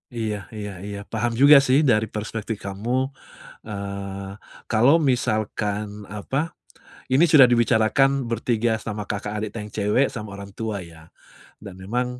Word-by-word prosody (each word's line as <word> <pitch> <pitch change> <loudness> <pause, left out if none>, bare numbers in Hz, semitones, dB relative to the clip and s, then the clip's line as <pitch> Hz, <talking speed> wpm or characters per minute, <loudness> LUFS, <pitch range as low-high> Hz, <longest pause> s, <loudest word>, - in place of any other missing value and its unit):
Iya 110 -3 -3
iya 105 -2 -6
iya. 100 0 -6
Paham 120 +1 -1
juga 140 0 +8
sih, 140 +3 +3
dari 110 -4 +4
perspektif 110 0 -4
kamu, 120 +8 -2 0.5
eee, 100 -2 -6 0.4
kalau 125 +8 +4
misalkan 105 -6 -1
apa, 130 - -3 0.6
ini 140 +6 +5
sudah 150 -4 +8
dibicarakan 120 +3 +3
bertiga 115 -1 0
sama 105 -1 -5
Kakak, 105 0 -4
adiknya 105 0 -5
cewek, 105 +6 +1
sama 105 -5 -7
orang 100 0 -8
tua 110 -3 -3
ya, 85 -2 -14 0.5
dan 95 -3 -10
memang, 125 +6 -3
110 Hz, 135 wpm, -23 LUFS, 105-125 Hz, 0.6 s, juga